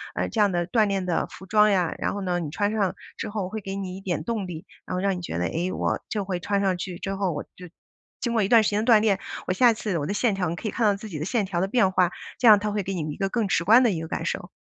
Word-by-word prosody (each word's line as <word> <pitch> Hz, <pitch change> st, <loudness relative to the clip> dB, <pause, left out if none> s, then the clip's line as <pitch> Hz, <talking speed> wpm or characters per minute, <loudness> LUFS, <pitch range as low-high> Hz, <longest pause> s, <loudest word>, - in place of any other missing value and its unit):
呃， -, -, -1 dB
这 220 Hz, -, 0 dB
样 205 Hz, -2 st, +4 dB
的 175 Hz, -1 st, 0 dB
锻 215 Hz, +4 st, +2 dB
炼 195 Hz, -2 st, -1 dB
的 175 Hz, -2 st, 0 dB
服 190 Hz, -, -12 dB
装 210 Hz, +2 st, +4 dB
呀， 185 Hz, -5 st, +1 dB
然 -, -, -1 dB
后 205 Hz, -, -4 dB
呢， 180 Hz, -2 st, -1 dB
你 160 Hz, -4 st, -4 dB
穿 205 Hz, +7 st, -1 dB
上 205 Hz, -4 st, 0 dB, 0.2 s
之 220 Hz, -, -5 dB
后 205 Hz, -3 st, -3 dB
会 220 Hz, +3 st, -5 dB
给 195 Hz, 0 st, -5 dB
你 190 Hz, -2 st, -5 dB
一 190 Hz, -, -9 dB
点 185 Hz, -3 st, -2 dB
动 225 Hz, -5 st, -2 dB
力。 165 Hz, -3 st, -7 dB, 0.2 s
然 -, -, -3 dB
后 -, -, -1 dB
让 195 Hz, -1 st, +1 dB
你 180 Hz, -, -6 dB
觉 170 Hz, -, -4 dB
得： 90 Hz, -, 0 dB
“哎， 175 Hz, +3 st, -1 dB
我 -, -, -1 dB
就 205 Hz, -2 st, -2 dB
会 185 Hz, -2 st, -2 dB
穿 200 Hz, +2 st, 0 dB
上 190 Hz, -2 st, +1 dB
去 180 Hz, -1 st, -5 dB
之 195 Hz, +2 st, -4 dB
后， 195 Hz, -2 st, -1 dB
我 150 Hz, -, -4 dB
就 180 Hz, -1 st, -11 dB, 0.5 s
经 240 Hz, -2 st, -2 dB
过 225 Hz, -, +2 dB
一 195 Hz, -, +1 dB
段 230 Hz, -2 st, +6 dB
时 210 Hz, -, +1 dB
间 210 Hz, +1 st, 0 dB
的 240 Hz, -, +3 dB
锻 220 Hz, -, +8 dB
炼， 210 Hz, -3 st, +2 dB, 0.3 s
我 185 Hz, -, 0 dB
下 240 Hz, +5 st, +5 dB
次， 205 Hz, -6 st, -2 dB
我 145 Hz, -, -3 dB
的 200 Hz, -, -2 dB
线 220 Hz, 0 st, +2 dB
条” 185 Hz, -3 st, -1 dB
你 170 Hz, -, -3 dB
可 215 Hz, -, -5 dB
以 -, -, -2 dB
看 240 Hz, -, -2 dB
到 205 Hz, -, +3 dB
自 215 Hz, +2 st, -9 dB
己 160 Hz, -6 st, -5 dB
的 155 Hz, -, -3 dB
线 215 Hz, +2 st, 0 dB
条 180 Hz, -2 st, -2 dB
的 190 Hz, -, +1 dB
变 195 Hz, -3 st, +2 dB
化， 180 Hz, -2 st, +3 dB, 0.3 s
这 245 Hz, -, +4 dB
样 215 Hz, -2 st, +10 dB
它 210 Hz, +1 st, -2 dB
会 205 Hz, 0 st, -1 dB
给 195 Hz, 0 st, -4 dB
你 155 Hz, -3 st, -3 dB
一 -, -, -11 dB
个 195 Hz, -, -1 dB
更 225 Hz, 0 st, 0 dB
直 170 Hz, -, +1 dB
观 225 Hz, +8 st, +6 dB
的 235 Hz, -, +3 dB
一 165 Hz, -4 st, -3 dB
个 165 Hz, -, -5 dB
感 -, -, -4 dB
受。 -, -, -3 dB
195 Hz, 355 characters per minute, -25 LUFS, 180-210 Hz, 0.5 s, 样